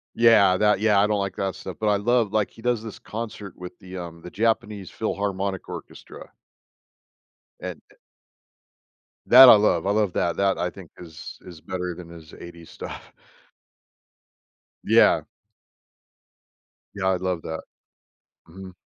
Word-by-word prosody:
Yeah, 110 -5 +5
that 105 0 +2
yeah, 105 -2 +4
I 100 - +3
don't 105 -1 0
like 100 -1 -4
that 95 -2 -2
stuff, 95 -2 -8
but 110 - -1
I 105 - +3
love 115 0 +1
like, 105 -2 +1
he - - -16
does 120 -2 -1
this 110 -3 -9
concert 105 -3 -7
with 90 0 -10
the, 95 0 -10
um, 85 -2 -8
the 90 - -9
Japanese 105 -2 -1
Philharmonic 100 -3 -3
Orchestra - - -10 1.3
and, - - -7
eh - - -22 1.3
That, 130 +1 +10
I - - +10
love. 100 -5 +2
I 100 - +1
love 105 -3 +1
that. 85 - 0
That, 100 -1 +1
I 90 - -1
think, 90 -3 -13
is 80 -3 -10
is 85 -3 -12
better 90 +1 -4
than 85 0 -11
his 80 -2 -13
80s 85 -1 -12
stuff. - - -9 1.7
Yeah. - - +4 1.7
Yeah, 95 -2 -2
I 95 - +2
love 90 -2 -3
that. 80 0 -5 0.9
Mhm. 95 +2 -11
95 Hz, 150 wpm, -24 LUFS, 90-105 Hz, 1.7 s, That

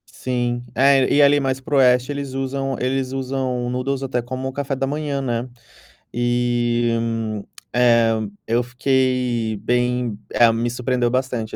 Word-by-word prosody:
Sim, 120 -1 -2
é 135 -1 +4
e 145 - +5
ali 145 0 +5
mais 135 -1 -1
para 145 +2 -3
o - - +4
oeste 125 0 +4
eles 140 -2 -5
usam 135 0 -2
eles 130 0 -1
usam 130 -2 -2
noodles 130 +2 -2
até 125 -2 -1
como 130 +2 -5
café 140 +1 -3
da 135 +1 -1
manhã, 145 -1 -2
né. 120 -1 -2 0.6
E, 120 -1 +1
hum, 115 -2 -2 0.3
eh, 115 -2 +4 0.4
eu 115 +2 +1
fiquei 125 -3 0
bem, 125 -2 0
eh, 120 -1 +5
me 115 +1 -1
surpreendeu 125 0 0
bastante 125 -3 -2
125 Hz, 150 wpm, -21 LUFS, 120-135 Hz, 0.6 s, e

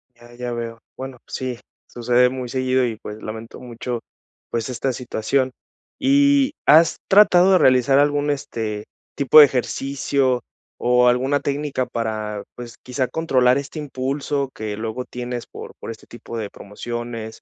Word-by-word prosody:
Ya, 120 0 -17
ya 120 0 -5
veo. 115 -1 -5 0.2
Bueno, 130 -1 -7
sí, 125 -2 -4 0.3
sucede 125 +1 +2
muy 130 -1 -5
seguido, 130 0 +1
y 115 -2 -2
pues 105 0 -9
lamento 110 +1 -8
mucho, 120 0 -5 0.5
pues, 115 +1 -2
esta 130 +1 -2
situación. 130 +2 -1 0.5
Y, 280 0 +4
¿has 160 +2 +6
tratado 190 -2 +6
de - - +7
realizar 130 -1 +4
algún, 145 0 +2
este, 110 -7 -3 0.3
tipo 140 +2 +6
de 150 - +12
ejercicio 135 0 0 0.4
o 125 0 +4
alguna 130 +4 +1
técnica 140 -2 -2
para, 110 -3 -3
pues, 120 -2 -9
quizá, 125 0 -2
controlar 130 -6 +2
este 140 +3 -6
impulso 140 0 -2
que 105 -1 -5
luego 110 +3 -4
tienes 125 -1 -6
por - - -10
por - - -6
este 110 - -12
tipo 115 0 -9
de 105 -3 -4
promociones, 115 +2 -7
125 Hz, 150 wpm, -21 LUFS, 115-140 Hz, 0.5 s, de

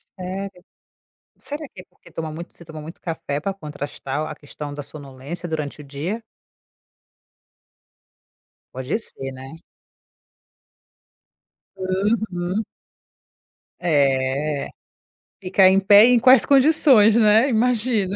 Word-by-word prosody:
Sério? 185 0 -7 0.8
Será 295 -1 -5
que 190 - -13
é - - -24
porque - - -21
toma 160 -1 -5
muito 170 +3 -9
você 170 - -14
toma 160 -1 -9
muito 160 +3 -11
café 150 -4 -4
pra 195 +4 -3
contrastar 150 -3 -5
a - - -6
questão 145 0 -9
da 145 - -6
sonolência 145 +4 -9
durante 155 -2 -4
o 150 - -10
dia? 155 +11 -5 2.5
Pode 130 +8 -2
ser, 135 -11 -7
né. 135 +5 -11 2.1
Uhum. 190 0 -1 1.2
É, 140 -2 0 0.7
ficar 190 0 +4
em 190 +1 +4
pé 205 +2 +7
em 245 0 +5
quais 255 +1 +6
condições, 270 -6 +5
né, 220 +3 +4
imagina, 225 -4 +1
180 Hz, 110 wpm, -22 LUFS, 145-210 Hz, 2.5 s, pé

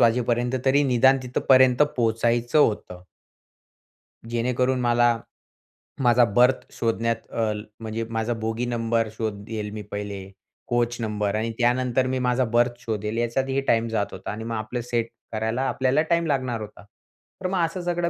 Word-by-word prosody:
वाजेपर्यंत 120 +1 +2
तरी 140 +2 +4
निदान 130 +1 +4
तिथपर्यंत 130 +1 +4
पोहचायचं 120 +3 +1
होतं. 105 -9 +1 1.3
जेणेकरून 125 +2 0
मला 120 -1 +3 0.9
माझा 120 0 +5
बर्थ 125 +2 +4
शोधण्यात 115 0 0 0.2
अ, 110 -2 0 0.3
म्हणजे 110 0 -4
माझा 115 +1 -1
बोगी 115 +2 -2
नंबर 115 -2 0
शोधेल 105 0 -4
मी 105 - -5
पहिले, 100 -2 -5 0.4
कोच 120 0 0
नंबर 105 -2 -1
आणि 110 +1 -1
त्यानंतर 125 +1 +2
मी 130 0 -1
माझा 125 0 +1
बर्थ 120 0 +2
शोधेल 110 -2 -3
याच्यातही 135 +3 0
टाईम 115 0 +3
जात 110 -2 -1
होता 95 - -6
आणि 110 +2 -6
मग 115 0 -3
आपलं 110 +3 -3
सेट 115 -1 -1 0.2
करायला 110 +3 -1
आपल्याला 130 +3 +2
टाईम 170 0 +3
लागणार 130 -5 -1
होता. 105 -1 -10
तर 145 - -11
मग 185 -1 -1
असं 175 +2 -5
सगळं 175 -1 0
120 Hz, 145 wpm, -24 LUFS, 110-125 Hz, 1.3 s, माझा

